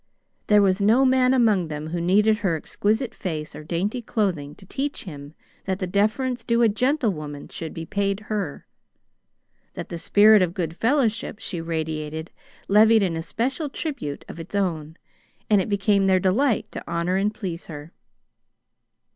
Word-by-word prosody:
There 210 -1 +5
was 190 0 +2
no 230 +7 +4
man 255 -1 +4
among 220 -9 +3
them 150 0 -5
who 170 0 -2
needed 210 +5 +3
her 190 -6 0
exquisite 215 - -1
face 155 -5 -5
or 155 - -8
dainty 190 +10 -2
clothing 185 -11 -2
to 195 - -16
teach 275 +8 -3
him 145 -4 -10 0.3
that 190 -1 -1
the 190 - -3
deference 220 +6 0
due 235 +1 +2
a 230 - +5
gentlewoman 205 - -1
should 160 -2 -6
be 165 - -6
paid 200 +1 -1
her. 205 -8 -4 1.1
That - - -6
the 170 - -5
spirit 210 +4 +6
of 180 -1 0
good 165 -4 -3
fellowship 230 -2 0
she 175 -6 -4
radiated 160 -1 -4 0.4
levied 215 +1 +5
an 175 -4 0
especial 255 - -2
tribute 275 - -5
of - - -9
its 165 +5 -8
own, 165 -5 -2 0.5
and 205 -2 +5
it 190 - -4
became 200 -1 +2
their 190 -1 +4
delight 215 +7 +1
to - - -7
honor 170 +2 0
and 205 +2 +1
please 180 -6 -6
her. 150 0 -9
195 Hz, 165 wpm, -24 LUFS, 165-220 Hz, 1.1 s, spirit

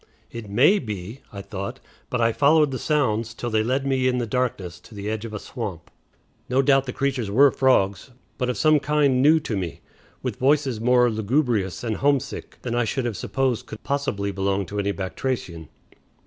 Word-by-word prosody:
"It 115 -3 -8
may 140 - +4
be," 105 - -6
I 100 -1 -7
thought, 100 -1 -6 0.3
but 125 - -1
I 115 0 +3
followed 150 +3 +4
the 130 - -3
sounds 115 -7 0
till 120 0 -4
they 110 0 +2
led 130 +4 0
me 130 -1 +1
in 125 -1 +1
the 120 - -1
darkness 110 -7 -2
to 115 - -15
the 100 0 -6
edge 110 0 -4
of 110 - -7
a - - -2
swamp. 100 -7 -7 0.6
No 130 +2 +3
doubt 135 -1 +3
the - - -2
creatures 130 -5 -1
were 135 +7 +5
frogs, 100 -5 +2 0.3
but 125 - 0
of 125 - -2
some 155 -1 +4
kind 145 -3 +2
new 155 +4 +6
to 115 - -3
me, 90 -4 -4 0.4
with - - -3
voices 135 -4 +2
more 125 +1 +4
lugubrious 110 - 0
and 110 -3 -2
homesick 140 -2 -1
than 120 - -3
I 120 0 +2
should 125 +3 -2
have 120 -3 -2
supposed 130 -1 -1
could 110 - -9
possibly 120 -8 -1
belong 95 0 -1
to 105 +3 -5
any 100 0 0
batrachian. 95 - -4
120 Hz, 195 wpm, -24 LUFS, 105-135 Hz, 0.6 s, new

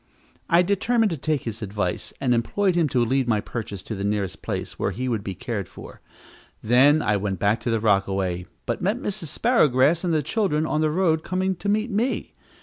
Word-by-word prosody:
I 175 0 +5
determined 215 +3 +1
to - - -1
take 150 0 -1
his 115 -1 -5
advice, 100 -3 -3
and 125 -2 +2
employed 185 - +1
him 170 -3 +2
to 125 -2 +2
lead 130 +1 +1
my 110 -3 +2
purchase 105 -3 -6
to 110 - -6
the 100 -2 -4
nearest 100 -2 -2
place - - -5
where - - 0
he 130 +2 -4
would 115 -5 -1
be 95 -2 -5
cared 100 0 -4
for. - - -12 0.6
Then 135 +7 +5
I 105 -1 +2
went 100 -1 -2
back 105 +5 +1
to 120 - -3
the 115 -1 +1
rockaway, 95 -4 0 0.2
but 120 - -2
met 205 +6 +1
Mrs. 200 -8 -4
Sparrowgrass 155 - +3
and 175 - 0
the 155 -2 +1
children 170 -5 0
on 155 0 0
the 155 - +2
road 160 -1 +1
coming 185 +1 -1
to 200 - -3
meet 215 +3 0
me. 230 +6 -1
130 Hz, 210 wpm, -24 LUFS, 105-180 Hz, 0.6 s, I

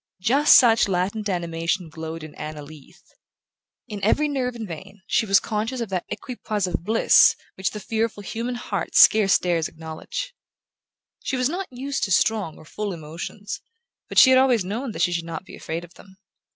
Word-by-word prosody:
Just 275 +10 +5
such 230 -4 +6
a - - -3
latent 200 +4 -1
animation 170 0 -2
glowed 160 0 -7
in 155 - -10
Anna 150 -1 -7
Leath. 155 +4 -15 0.8
In 210 -4 -7
every 295 +9 +3
nerve 255 -4 -2
and 225 -2 -6
vein 190 +4 -10
she 220 - +1
was 195 0 +5
conscious 225 +4 -3
of 230 -3 -3
that 185 -2 -3
equipoise 215 -5 -3
of 175 -2 -3
bliss 220 +4 +5 0.2
which 190 -1 -2
the 210 - -7
fearful 220 0 -2
human 235 +4 -4
heart 240 - -4
scarce 210 -3 +6
dares 170 -3 0
acknowledge. 160 - -7 0.9
She 265 - -2
was 255 +1 +1
not 365 +4 -4
used 270 +2 -4
to 195 - -6
strong 205 -4 +1
or - - -15
full 205 +5 -4
emotions; 170 +6 -7 0.5
but - - -6
she 260 - +9
had 260 - +7
always 250 -7 +3
known 230 +6 -4
that - - -1
she 175 - +2
should 170 -1 -2
not 165 +1 -7
be - - -11
afraid 165 +2 -5
of 175 0 -14
them. 190 -1 -18
200 Hz, 190 wpm, -23 LUFS, 170-230 Hz, 0.9 s, she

